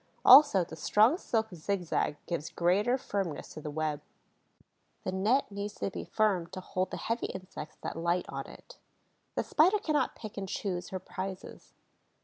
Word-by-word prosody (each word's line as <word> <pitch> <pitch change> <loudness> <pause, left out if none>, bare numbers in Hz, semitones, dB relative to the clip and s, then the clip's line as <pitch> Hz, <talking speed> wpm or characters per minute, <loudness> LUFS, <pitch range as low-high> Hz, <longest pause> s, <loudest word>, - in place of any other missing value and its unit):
Also, 260 -8 +9
the 165 - -9
strong 215 - +4
silk 220 - -1
zigzag 175 -3 -1
gives 170 -2 -3
greater 190 +9 +2
firmness 195 - -3
to 155 - -8
the 150 - -5
web. 150 -1 -2 1.0
The - - -2
net 210 +6 +1
needs 200 +1 -5
to 195 - -3
be - - -6
firm 200 -6 +1
to 185 +2 -7
hold 185 0 -2
the - - -5
heavy 230 +1 -2
insects 185 -5 -8
that - - -4
light 170 +2 0
on - - -5
it. - - -14 0.6
The - - 0
Spider 365 +7 +4
cannot 310 -7 0
pick 215 -2 -9
and 195 -1 -4
choose 180 -3 -3
her 190 - -3
prizes. 185 +1 -7
190 Hz, 165 wpm, -30 LUFS, 170-215 Hz, 1.0 s, Also